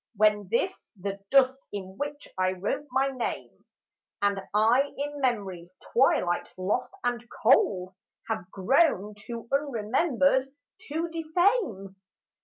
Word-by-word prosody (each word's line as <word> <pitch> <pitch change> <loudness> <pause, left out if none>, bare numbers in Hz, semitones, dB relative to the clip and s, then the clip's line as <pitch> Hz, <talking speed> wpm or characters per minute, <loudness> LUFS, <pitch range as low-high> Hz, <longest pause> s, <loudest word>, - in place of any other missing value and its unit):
When 210 -1 +3
this, 370 - -1
the 200 +1 -4
dust 265 -1 +4
in 190 -2 -6
which 290 +4 -5
I 185 0 +1
wrote 200 +10 -3
my 270 +2 +2
name, 255 -3 -5 0.5
And 200 -1 +1
I 235 +7 +3
in 290 0 -4
memory's 190 -8 -2 0.2
twilight 205 -8 +2
lost 205 +7 -1
and 240 -1 -1 0.2
cold 195 -6 +4 0.3
Have 215 -5 -3
grown 210 - +2
too 230 +3 -8
unremembered 270 +1 +2 0.4
to 320 +3 -1
defame 325 - 0
235 Hz, 115 wpm, -27 LUFS, 195-275 Hz, 0.5 s, dust